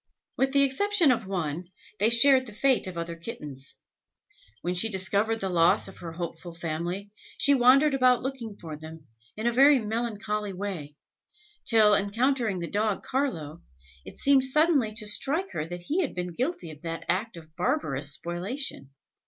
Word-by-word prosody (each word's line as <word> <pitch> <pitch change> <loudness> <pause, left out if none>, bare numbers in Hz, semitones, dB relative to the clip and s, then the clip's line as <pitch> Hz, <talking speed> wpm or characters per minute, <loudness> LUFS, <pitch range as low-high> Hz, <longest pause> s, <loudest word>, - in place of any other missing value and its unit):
With 265 0 +1
the 280 0 +4
exception 335 +4 +3
of 230 -5 -1
one, 175 -3 -3 0.3
they 210 +3 +4
shared 260 +2 +5
the 215 - -10
fate 260 -1 +2
of 180 -2 -7
other 170 0 -4
kittens. 145 -5 -7 0.9
When 175 - -1
she 180 +5 +3
discovered 205 +3 +1
the 195 - -1
loss 170 -1 +3
of 195 - -12
her 165 -2 -8
hopeful 170 0 -7
family, 170 +5 -4 0.3
she 285 - +5
wandered 275 +3 +5
about 255 -2 +3
looking 245 -6 -5
for 160 -3 -8
them, 160 0 -11 0.3
in 215 - -4
a 240 - +3
very 275 +3 +6
melancholy 210 -2 -3
way, 180 -7 -6 0.7
till, 215 -3 +5
encountering 220 0 +1
the 170 - -3
dog 210 +1 -1
Carlo, 170 - -3 0.4
it - - -12
seemed 275 -1 +4
suddenly 285 -4 +3
to 215 -1 -5
strike 295 - -1
her 150 - -4
that 175 +1 -7
he 310 - -1
had 300 - -3
been 180 -1 -4
guilty 250 - -3
of 150 -1 -13
that 165 -1 -5
act 195 +2 -1
of 160 -1 -14
barbarous 155 - 0
spoliation. 175 - -4
210 Hz, 170 wpm, -27 LUFS, 170-260 Hz, 0.9 s, very